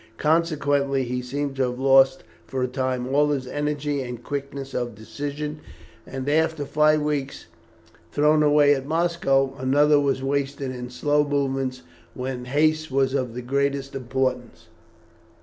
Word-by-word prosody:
Consequently 145 -4 +1
he 125 0 -3
seemed 140 +2 -3
to 130 -2 +1
have 125 - -6
lost 135 0 +4 0.2
for 130 -1 -2
a - - +1
time 130 -1 -2
all 150 +1 +4
his 140 -3 -1
energy 145 +1 -2
and 125 -2 -7
quickness 140 -1 -5
of 120 -3 -3
decision, 145 +7 -5 0.5
and 135 0 -6
after 160 0 +1
five 155 +1 +3
weeks 145 -2 -3 0.7
thrown 150 +1 +3
away 145 -1 +5
at 135 -1 -3
Moscow, 155 -5 +1
another 145 +3 +4
was 140 -2 0
wasted 140 -1 -2
in 125 -1 -6
slow 145 +3 +1
movements 135 - -1 0.3
when 125 -1 -4
haste 155 +4 +1
was 135 0 +1
of 125 -4 -2
the 125 - -5
greatest 140 +1 -1
importance. 130 -1 -3
140 Hz, 145 wpm, -24 LUFS, 130-145 Hz, 0.7 s, away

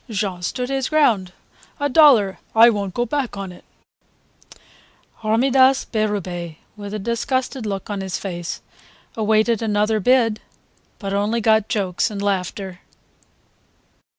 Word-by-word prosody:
Jean 195 -4 -3
stood 250 +8 -3
his 270 -2 -1
ground: 230 - +2 0.5
"A 285 - +1
dollar, 260 -10 +5 0.2
I 230 +1 +8
won't 200 -3 -4
go 240 - 0
back 255 -3 -3
on 195 -2 -5
it." 180 - -15 1.5
Hormidas 260 +4 +3
Berube 185 -7 -3 0.2
with 205 -1 -8
a - - -1
disgusted 235 +3 -2
look 195 -2 -4
on 200 -1 -3
his 190 -1 -3
face 175 -3 -6 0.5
awaited 220 +1 +2
another 215 0 +1
bid, 230 0 +2 0.6
but 195 -2 -5
only 205 +4 0
got 220 -1 +2
jokes 190 -6 0
and 205 -2 -6
laughter. 190 -1 -3
215 Hz, 125 wpm, -21 LUFS, 195-240 Hz, 1.5 s, I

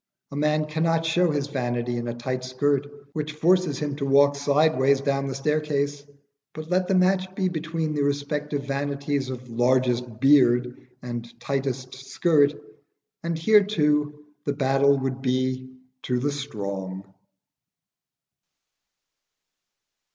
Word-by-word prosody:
A - - -7
man 150 +1 +1
cannot 165 +1 0
show 175 +2 +2
his 145 -2 0
vanity 120 -3 -2
in 120 0 -4
a 120 - -2
tight 125 +1 -4
skirt 140 +2 0 0.3
which 155 0 -4
forces 170 -1 +2
him 145 -2 -3
to 140 - -2
walk 140 +1 +5
sideways 140 -1 +3
down 140 0 0
the 135 - -4
staircase; 145 0 -1 0.5
but 155 +2 -8
let 185 0 +2
the 190 - +2
match 185 0 +2
be 190 -1 0
between 160 -2 -3
the 145 - -1
respective 145 0 -2
vanities 140 0 -2
of 125 -1 -7
largest 125 -1 +1
beard 125 -3 +3 0.2
and 120 -1 -7
tightest 135 -1 -3
skirt, 145 +2 +2 0.7
and 170 -2 -2
here 210 +6 +5
too 150 -6 0 0.2
the 145 - -1
battle 140 0 +3
would 135 0 -3
be 130 0 -1 0.3
to 125 - -1
the 145 +4 0
strong. 100 -9 -5
140 Hz, 130 wpm, -25 LUFS, 130-150 Hz, 0.7 s, walk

